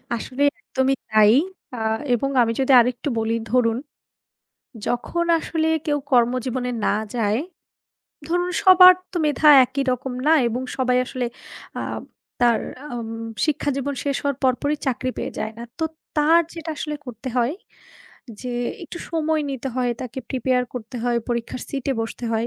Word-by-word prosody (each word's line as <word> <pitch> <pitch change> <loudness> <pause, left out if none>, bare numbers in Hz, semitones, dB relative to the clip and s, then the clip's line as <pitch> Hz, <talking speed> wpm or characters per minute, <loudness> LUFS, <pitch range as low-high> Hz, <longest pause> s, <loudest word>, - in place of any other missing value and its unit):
আসলে 255 +4 -3 0.2
একদমই 265 0 0 0.2
তাই 215 -1 +6 0.4
অ্যা 245 -3 -6 0.3
এবং 260 +3 0
আমি 230 -1 +2
যদি 270 0 +2
আরেকটু 245 +4 0
বলি 225 +1 0 0.2
ধরুন, 235 -2 +3 1.1
যখন 340 +8 -1
আসলে 320 0 -1 0.2
কেউ 295 -1 +1
কর্মজীবনে 250 +1 +1 0.2
না - - +2 0.2
যায়, 220 -1 +1 0.9
ধরুন 355 +2 0
সবার 370 -1 +9 0.2
তো 360 - -2
মেধা 300 +1 +4 0.2
একই 275 +2 -2
রকম 255 +1 -3
না 320 - +6
এবং 235 +2 -2 0.2
সবাই 250 -1 +2
আসলে 255 -1 -3 0.5
আব - - -4 0.4
তার 240 -2 +4 0.2
অ্যাম 245 -6 -6 0.4
শিক্ষাজীবন 285 -2 -1
শেষ 280 -1 0
হওয়ার 280 -2 -1
পরপরই 275 +3 +1
চাকরি 255 -1 -1
পেয়ে - - -3
যায় 220 +1 -3
না। 235 - -7 0.2
তো 320 - +1 0.3
তার 320 +3 +5
যেটা 330 -1 -7
আসলে 300 -1 -3
করতে 250 +1 -8
হয় 245 +4 +2 0.9
যে 250 -1 -4 0.3
একটু 345 +1 -8
সময় 315 -2 0
নিতে 270 0 -4
হয়, 250 -1 +1
তাকে 255 0 -6
প্রিপেয়ার 255 -1 +1
করতে 245 +1 -6
হয়, 240 -1 +1
পরীক্ষার 240 +1 -3
সিটে 275 -1 -2
বসতে 225 +2 -5
হয়। 225 +1 0
255 Hz, 150 wpm, -22 LUFS, 240-290 Hz, 1.1 s, সবার